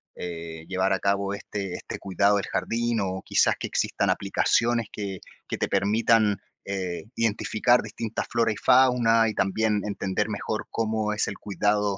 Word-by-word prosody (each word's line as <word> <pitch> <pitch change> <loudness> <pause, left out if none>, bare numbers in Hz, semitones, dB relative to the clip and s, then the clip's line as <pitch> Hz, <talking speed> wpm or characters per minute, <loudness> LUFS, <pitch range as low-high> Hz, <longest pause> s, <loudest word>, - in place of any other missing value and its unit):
eh, 80 -2 -7
llevar 95 +1 +1
a 95 - 0
cabo 100 0 0
este 100 -2 -5
este - - -6
cuidado 100 +2 +2
del 100 - 0
jardín, 115 0 -1
o 95 0 -3
quizás - - +3
que - - -3
existan - - 0
aplicaciones 115 -1 +1
que 100 -3 -5 0.3
que - - -3
te - - 0
permitan, 110 0 +3 0.3
eh, 95 -2 -4
identificar 115 +2 +2
distintas 110 +1 -4
flora 115 -1 +2
y - - -3
fauna, 125 -3 +4
y 110 - -1
también 105 +2 +1
entender 95 -2 -2
mejor - - -3
cómo 110 -1 -1
es 105 - 0
el 100 - -5
cuidado 105 -1 0
105 Hz, 160 wpm, -26 LUFS, 95-115 Hz, 0.3 s, fauna